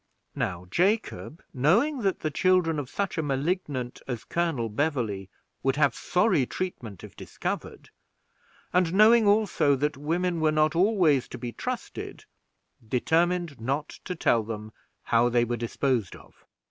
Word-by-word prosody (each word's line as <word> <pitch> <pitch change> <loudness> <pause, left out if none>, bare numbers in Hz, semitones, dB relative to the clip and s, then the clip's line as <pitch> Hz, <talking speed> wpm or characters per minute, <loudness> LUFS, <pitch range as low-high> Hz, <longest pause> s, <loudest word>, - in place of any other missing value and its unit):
Now 90 -1 -3
Jacob, 190 -4 0
knowing 210 - +2
that 195 -3 0
the 155 - -1
children 175 -1 +2
of 135 -4 -5
such 200 -4 -2
a - - +2
Malignant 140 -3 -2
as 120 -4 -4
Colonel 165 -9 -1
Beverley 110 - -2 0.3
would 135 0 +1
have 140 -4 +3
sorry 180 - +1
treatment 120 - -5
if - - -11
discovered, - - -6 0.8
and 180 -1 +2
knowing 220 +1 +6
also 205 -9 +3
that 145 +1 -1
women 170 +4 -1
were 155 -1 +3
not 155 +1 +2
always 175 - +3
to - - -8
be 120 0 -5
trusted, - - -6 0.6
determined 160 +5 0
not 135 +6 -2 0.2
to 180 - -4
tell 120 -7 +2
them 110 0 -7 0.3
how 120 +1 +3
they 120 0 +2
were 120 +1 -2
disposed 120 -2 -1
of. - - -18
150 Hz, 145 wpm, -27 LUFS, 120-180 Hz, 0.8 s, knowing